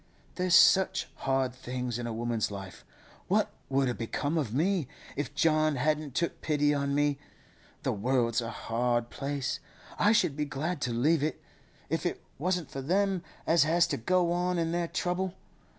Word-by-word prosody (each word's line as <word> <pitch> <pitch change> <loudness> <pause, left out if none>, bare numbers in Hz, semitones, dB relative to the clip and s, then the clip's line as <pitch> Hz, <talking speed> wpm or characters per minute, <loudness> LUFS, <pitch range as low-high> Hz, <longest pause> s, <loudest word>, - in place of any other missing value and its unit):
'There's 180 0 +2
such 190 0 +5
hard 135 -2 0
things 125 -1 -4
in 120 - -3
a - - -3
woman's 115 -1 -1
life. 95 -3 -8 0.4
What - - +2 0.2
would 135 0 +2
a' 125 - 0
become 140 +7 -2
of 145 -9 0
me, 165 - +1 0.3
if 145 -1 -4
John 155 -2 +3
hadn't 150 0 0
took 170 - -1
pity 150 -1 +2
on 140 -1 0
me! 145 -1 +1 0.6
The - - +1
world's 115 +2 +1
a 115 - -4
hard 120 +1 -1
place; 140 -1 -3 0.4
I 210 - +5
should 220 -10 +3
be 150 0 -1
glad 150 +3 -3
to 125 - -1
leave 140 +7 +2
it, 155 +2 -1 0.5
if - - -1
it - - -3 0.2
wasn't 175 0 -1
for 135 - -4
them 190 +5 +1 0.2
as 165 +1 +4
has 170 +3 +4
to - - -1
go 175 +8 +2
on 180 +1 0
in 165 -1 0
their 170 0 0
trouble. 180 +2 -2
145 Hz, 175 wpm, -29 LUFS, 125-170 Hz, 0.6 s, such